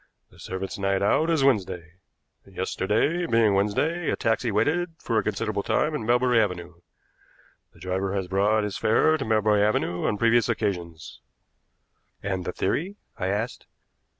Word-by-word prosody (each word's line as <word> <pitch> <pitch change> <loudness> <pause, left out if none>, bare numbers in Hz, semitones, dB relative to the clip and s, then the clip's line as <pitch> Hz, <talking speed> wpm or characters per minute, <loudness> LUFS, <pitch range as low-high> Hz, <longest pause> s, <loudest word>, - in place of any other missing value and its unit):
The - - -20
servant's 95 +1 -5
night 100 0 0
out 155 +10 +2
is 160 -4 +2
Wednesday. 90 -9 0 0.5
Yesterday, 105 - -1
being 115 -5 +3
Wednesday, 145 - 0
a - - +1
taxi 115 +1 0
waited 160 - 0
for 115 -7 0
a - - -2
considerable 105 -1 -2
time 150 +8 0
in 110 -7 -4
Melbury 120 -1 +3
Avenue. 90 -4 -4 0.9
The 85 - -20
driver 95 +2 -2
has 95 -2 -2
brought 105 +3 +2
his 105 -2 -4
fare 155 +8 +3
to 150 - -3
Melbury 110 -2 +2
Avenue 90 -4 0
on 105 - 0
previous 115 +2 +3
occasions." 90 -8 -3 1.0
"And 95 -3 -3
the - - -2
theory?" 175 - -2 0.2
I 95 - -1
asked. 105 +5 -3
105 Hz, 150 wpm, -25 LUFS, 95-120 Hz, 1.0 s, being